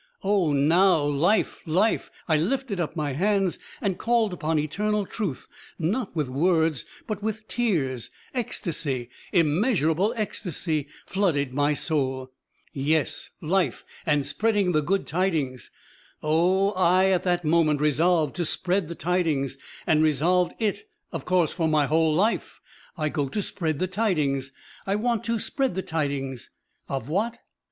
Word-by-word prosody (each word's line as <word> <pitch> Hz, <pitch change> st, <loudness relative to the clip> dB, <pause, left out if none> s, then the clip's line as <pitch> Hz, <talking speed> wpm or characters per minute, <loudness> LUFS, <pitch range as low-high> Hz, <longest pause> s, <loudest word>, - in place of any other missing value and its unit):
Oh, 195 Hz, -5 st, +2 dB
now, 160 Hz, +4 st, +4 dB
life, 150 Hz, +9 st, +1 dB
life! 190 Hz, +8 st, +2 dB, 0.2 s
I 160 Hz, -, +3 dB
lifted 205 Hz, -, -1 dB
up 170 Hz, -1 st, -2 dB
my 150 Hz, -3 st, -1 dB
hands 195 Hz, +4 st, +1 dB, 0.2 s
and 195 Hz, -3 st, -1 dB
called 230 Hz, -4 st, +2 dB
upon 160 Hz, -2 st, -1 dB
eternal 205 Hz, +8 st, 0 dB
truth, 190 Hz, -, -4 dB, 0.3 s
not 190 Hz, +5 st, -1 dB
with 150 Hz, -4 st, 0 dB
words 160 Hz, +2 st, +1 dB, 0.2 s
but 215 Hz, -3 st, -4 dB
with 215 Hz, +1 st, -3 dB
tears; 150 Hz, -, -1 dB, 0.2 s
ecstasy, 150 Hz, -, -3 dB, 0.2 s
immeasurable 175 Hz, -, +2 dB
ecstasy 165 Hz, -8 st, -2 dB, 0.2 s
flooded 150 Hz, -9 st, 0 dB
my 145 Hz, +2 st, +2 dB
soul. 130 Hz, -5 st, -1 dB, 0.4 s
Yes, 145 Hz, +1 st, 0 dB
life 170 Hz, -5 st, 0 dB, 0.2 s
and 150 Hz, -3 st, +1 dB
spreading 210 Hz, -4 st, +1 dB
the 155 Hz, -2 st, +2 dB
good 195 Hz, +6 st, 0 dB
tidings! 155 Hz, -8 st, -1 dB, 0.5 s
Oh, 180 Hz, +6 st, +3 dB
I 185 Hz, 0 st, +3 dB
at 185 Hz, -, +2 dB
that 175 Hz, -2 st, +1 dB
moment 155 Hz, -2 st, +3 dB
resolved 155 Hz, +1 st, +2 dB
to 175 Hz, -, 0 dB
spread 180 Hz, +2 st, 0 dB
the 170 Hz, -, -6 dB
tidings, 160 Hz, -7 st, 0 dB, 0.3 s
and 155 Hz, -1 st, +3 dB
resolved 170 Hz, +4 st, +2 dB
it, 225 Hz, -, -2 dB, 0.2 s
of -, -, -5 dB
course, 180 Hz, -3 st, +2 dB
for 165 Hz, -3 st, 0 dB
my 155 Hz, -2 st, +3 dB
whole 155 Hz, +1 st, +2 dB
life. 210 Hz, +7 st, 0 dB, 0.4 s
I 155 Hz, -1 st, 0 dB
go 145 Hz, -2 st, -1 dB
to 205 Hz, -, -2 dB
spread 160 Hz, -6 st, -2 dB
the 185 Hz, -, 0 dB
tidings, 155 Hz, -, 0 dB, 0.4 s
I 195 Hz, -, +1 dB
want 230 Hz, 0 st, 0 dB
to 230 Hz, 0 st, 0 dB
spread 265 Hz, 0 st, -1 dB
the 190 Hz, -, -2 dB
tidings 140 Hz, -5 st, -3 dB, 0.4 s
of 135 Hz, -3 st, -3 dB
what? 210 Hz, +9 st, -1 dB
170 Hz, 145 wpm, -25 LUFS, 150-195 Hz, 0.5 s, now